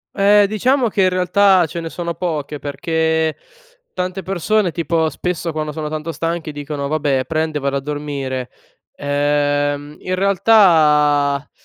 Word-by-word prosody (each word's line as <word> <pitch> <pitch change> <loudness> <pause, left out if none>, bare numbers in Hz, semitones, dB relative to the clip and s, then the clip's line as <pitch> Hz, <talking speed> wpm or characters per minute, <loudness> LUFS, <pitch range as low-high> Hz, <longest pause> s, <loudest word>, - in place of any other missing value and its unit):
Eh, 205 +1 +5
diciamo 245 +4 +1
che 195 -2 +1
in 185 - +4
realtà 185 0 +3
ce 170 - -6
ne 165 -1 -5
sono 170 0 -4
poche, 150 -4 -3
perché 160 +1 -1 0.6
tante 185 +1 -3
persone, 195 +1 0
tipo, 165 -1 0
spesso 170 +1 -3
quando 155 -1 -3
sono 150 0 -5
tanto 155 +1 -4
stanche 165 -1 -3
dicono: 145 -1 -5
"Vabbè, 145 -4 0
prendo 155 -1 -1
e - - -12
vado 140 0 -1
a - - -1
dormire," 140 -3 -4 0.5
ehm, 145 0 0
in 185 0 -2
realtà, 150 -8 +3
160 Hz, 145 wpm, -18 LUFS, 145-180 Hz, 0.6 s, Eh